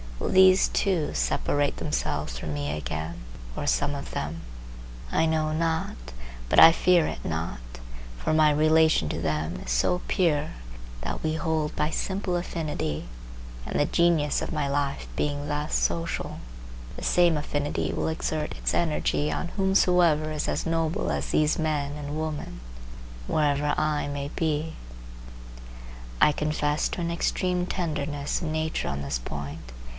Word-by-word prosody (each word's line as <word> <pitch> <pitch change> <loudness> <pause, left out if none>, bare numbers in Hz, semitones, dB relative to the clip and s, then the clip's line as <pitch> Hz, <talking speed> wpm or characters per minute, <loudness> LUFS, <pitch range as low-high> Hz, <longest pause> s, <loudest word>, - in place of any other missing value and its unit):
Will - - -2
these 185 0 +6
too 180 -6 0
separate 140 - 0
themselves 60 -4 -2
from 75 +4 -4
me 75 0 -2
again, 80 +1 -5 0.3
or - - -3
some 145 - +1
of 140 - -6
them? 75 +3 -4 0.7
I - - +3
know 155 -1 +1
not, 160 +1 -1 0.5
but - - +4
I 165 - +11
fear 175 0 +4
it - - -6
not; 80 -4 -3 0.6
for 155 - -1
my 155 -1 +5
relation 155 - +4
to - - -3
them 80 +1 -1
is - - -3
so 65 - +2
pure, 155 -4 +1 0.5
that - - -4
we 155 0 0
hold 160 -2 -1
by 150 - +1
simple 190 +1 -2
affinity, 155 - -3 0.6
and - - -2
the 145 - +4
Genius 165 -2 +2
of - - -3
my 140 - 0
life 140 0 -1
being 145 0 -1
thus 150 +1 -2
social, 170 0 -1 0.6
the - - -7
same 175 -2 +4
affinity 145 0 -2
will - - -1
exert 155 -1 -2
its - - -1
energy 150 -2 +1
on 175 - -3
whomsoever 180 -5 +3
is 150 -1 -2
as - - -1
noble 165 0 0
as - - -2
these 155 +1 +2
men 150 -3 -1
and 150 +1 -5
women, 155 - -4 0.7
wherever 145 -1 +1
I 155 -1 0
may 145 0 -4
be. 160 0 -1 1.5
I - - +6
confess 150 0 0
to - - -4
an 170 0 -1
extreme 180 +1 0
tenderness 150 -5 -2
of 170 - -3
nature 155 0 -1
on 70 +1 -3
this 70 -3 -2
point. 70 +1 -7
150 Hz, 150 wpm, -26 LUFS, 140-160 Hz, 1.5 s, I